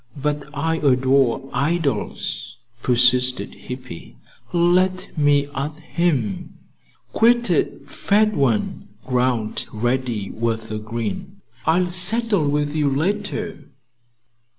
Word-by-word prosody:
"But 145 +1 -2
I 160 +2 -1
adore 130 -2 +2
idols," 140 -5 -2 0.2
persisted 125 +1 +2
Hippy. 125 -9 -9 0.3
"Let 180 +2 +2
me 145 -2 +3
at 150 +3 -4
him." 155 - -1 0.6
"Quit 235 +1 +3
it, - - -1
fat 215 +1 +2
one!" 130 - 0 0.2
growled 125 -4 0
Reddy, 120 -2 -1
with 110 -1 -2
a 110 - -3
grin. 120 - -5 0.3
"I'll 175 +2 +2
settle 195 -2 +3
with 145 +1 -1
you 150 -2 +2
later." 200 +7 -2
145 Hz, 100 wpm, -21 LUFS, 125-175 Hz, 0.6 s, me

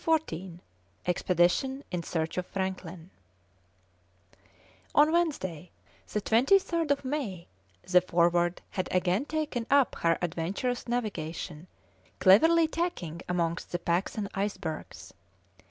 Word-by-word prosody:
CHAPTER 320 - +1
XIV 175 0 -9 0.5
EXPEDITION 180 - +1
IN 180 -2 -1
SEARCH 165 +1 -2
OF 180 - -5
FRANKLIN 185 -2 -5 1.8
On 300 +2 +6
Wednesday, 190 - -1 0.4
the 210 - 0
23rd 325 - +3
of 280 -1 +1
May, 255 - -3 0.4
the 180 0 +4
Forward 175 0 +2
had 185 - -2
again 185 +7 +1
taken 295 -7 -2
up 280 -2 +4
her 165 -1 +2
adventurous 180 +10 -2
navigation, 175 -8 -4 0.5
cleverly 325 - +6
tacking 310 - -3
amongst 170 -2 -1
the 175 - 0
packs 175 +2 -1
and 205 -2 -2
icebergs. 195 -6 -4
190 Hz, 110 wpm, -29 LUFS, 175-270 Hz, 1.8 s, On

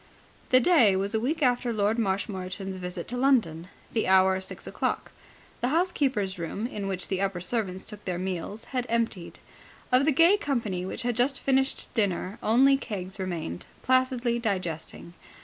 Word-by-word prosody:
The 255 - +6
day 245 - +5
was 195 +2 -1
a 220 - +2
week 295 +7 -1
after 245 -1 +2
Lord 215 +1 +1
Marshmoreton's 190 -2 -3
visit 180 -1 -6
to 245 - -2
London, 225 - +2 0.3
the 225 - 0
hour 190 0 +4
six 190 - -7
o'clock. - - -2 0.5
The 245 - 0
housekeeper's 265 - 0
room, 170 +6 -3
in 210 -5 -4
which 185 -1 -3
the 190 -1 -1
upper 195 -2 -1
servants 190 -1 -2
took 210 -1 -10
their 180 -2 -2
meals, 190 +4 -4
had 250 -1 -1
emptied. 225 -7 -1 0.5
Of 255 +2 +4
the 310 - +4
gay 335 +8 +5
company 225 - -2
which - - -4
had 240 -1 0
just 255 +3 +1
finished 270 0 0
dinner 200 -2 -1
only 265 +5 +5
Keggs 195 -6 -6
remained, 170 - -4 0.2
placidly 255 -2 +2
digesting. 180 -6 -3
210 Hz, 165 wpm, -27 LUFS, 185-250 Hz, 0.5 s, The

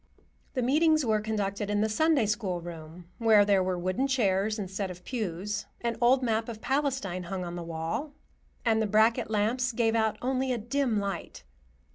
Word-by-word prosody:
The 255 - 0
meetings 310 +3 +3
were 215 -2 +2
conducted 205 -2 -2
in 205 0 +1
the 215 - +2
Sunday 285 +3 +2
School 205 -4 -1
room, 170 0 -10
where 220 -3 +5
there 200 -2 +3
were 185 -1 -1
wooden 185 +9 0
chairs 215 -5 +1
instead 195 -1 -3
of 180 0 -9
pews; 205 -3 -3
an 235 -1 -1
old 255 +2 +4
map 225 -1 0
of 225 -2 -6
Palestine 260 -9 -1
hung 185 0 -4
on 175 0 -6
the 175 - -5
wall, 170 - -4 0.5
and 225 -1 +3
the 220 - +1
bracket 220 +3 +3
lamps 225 +4 +1
gave 225 -1 +1
out 220 -1 +1
only 260 +1 0
a 245 - 0
dim 240 +1 0
light. 200 -3 -5
215 Hz, 180 wpm, -28 LUFS, 190-245 Hz, 0.5 s, where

